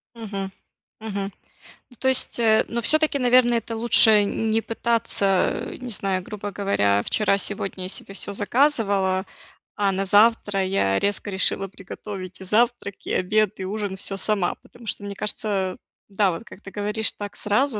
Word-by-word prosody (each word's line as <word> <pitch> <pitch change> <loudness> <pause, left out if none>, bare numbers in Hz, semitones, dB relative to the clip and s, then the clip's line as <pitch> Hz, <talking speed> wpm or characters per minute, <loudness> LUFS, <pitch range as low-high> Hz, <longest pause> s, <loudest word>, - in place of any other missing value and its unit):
Мгм. 200 -4 -6 0.5
Мгм. 200 -2 -5 0.6
Ну, 245 - -18
то - - -4
есть, 260 -1 +3
э, 220 -2 +4
ну, 235 - -2
всё-таки, 310 +4 +2
наверно, 250 -1 +4
это 230 0 -2
лучше 220 -2 +6
н 220 +2 -2
не 220 +1 +2
пытаться, 225 -4 0 0.2
э, - - -8
не 250 -1 -7
знаю, 195 -3 0
грубо 205 0 -7
говоря, 100 - +1
вчера-сегодня 195 - 0
я - - -4
себе 195 +1 -4
всё 200 - -5
заказывала, 200 -5 +1 0.5
а 200 -1 +1
на 195 +1 -2
завтра 205 -1 +3
я 100 - +1
резко 205 +1 0
решила 195 0 +1
приготовить 190 0 -9
и - - -7
завтрак, 220 0 0
и - - -3
обед, 210 +2 +1
и 190 - -4
ужин- 205 0 -4
всё 195 0 -3
сама. 195 -2 0
Потому 240 -2 -17
что, 205 - -3
мне 200 0 -6
кажется, 195 -2 0 0.3
да, 195 -1 +1
вот 170 +6 -6
как 205 - -14
ты 195 - -11
говоришь, 210 +2 +1
так 205 -1 -8
сразу, 220 +3 0
205 Hz, 170 wpm, -23 LUFS, 195-225 Hz, 0.6 s, лучше